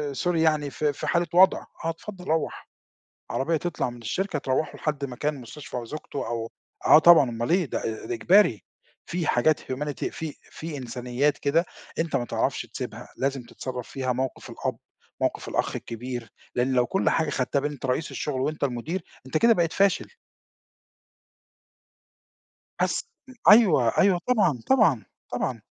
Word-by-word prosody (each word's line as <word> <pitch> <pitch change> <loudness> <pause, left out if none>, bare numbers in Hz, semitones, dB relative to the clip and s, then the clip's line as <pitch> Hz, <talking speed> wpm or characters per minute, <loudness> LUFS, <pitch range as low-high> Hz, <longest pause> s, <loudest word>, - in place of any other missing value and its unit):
sorry 175 +5 0
يعني 155 -3 +2
في 150 +1 0
في - - -5
حالة 170 0 +2
وضع 185 +2 +6 0.3
آه، - - +1
اتفضل 180 +3 -7
روّح 160 0 -2 0.6
عربية 160 +5 0
تطلع 170 -5 -2
من 120 -1 -10
الشركة 180 - -2
تروّحه 140 +3 -1
لحد 150 -2 -2
مكان 140 +2 -3
مستشفى 125 +2 -8
أو 120 - -4
زوجته 145 0 -5
أو 115 -1 -3 0.3
آه، 155 - +9
طبعًا 165 -6 +7
أمال 120 0 -3
إيه 180 +1 +3
ده 135 - -3
آآ، 110 -1 -4
إجباري 170 - +4 0.4
في 170 -2 -2
حاجات 150 +5 +3
humanity 145 +2 -3
في 160 -2 -5 0.2
في 160 -2 -6
إنسانيات 125 +3 -1
كده 160 +5 +2 0.3
أنت 165 -1 0
ما 120 - 0
تعرفش - - -1
تسيبها، - - -7
لازم 135 -1 -1
تتصرف 125 0 -6
فيها 130 -2 -1
موقِف 130 +1 -4
الأب، - - -3 0.4
موقِف - - -1
الأخ - - -1
الكبير 120 -1 -6 0.2
لأن 125 +2 +1
لو 125 -1 +3
كل 195 - +1
حاجة 160 -2 +1
خدتها 135 0 0
بإن 145 +2 -2
أنت 140 -2 -7
رئيس 130 +4 -1
الشغل 135 -3 -2
وأنت 155 +3 -2
المُدير 140 +8 -2 0.2
أنت 130 +4 0
كده 230 +8 +6
بقيت 170 -5 +1
فاشل. 200 -1 +2 2.7
أس - - +1 0.5
أيوه، 180 - +6
أيوه، 190 -2 +4
طبعًا، 210 - +3
طبعًا، 200 - +4 0.3
طبعًا. - - -2
145 Hz, 155 wpm, -26 LUFS, 125-165 Hz, 2.7 s, آه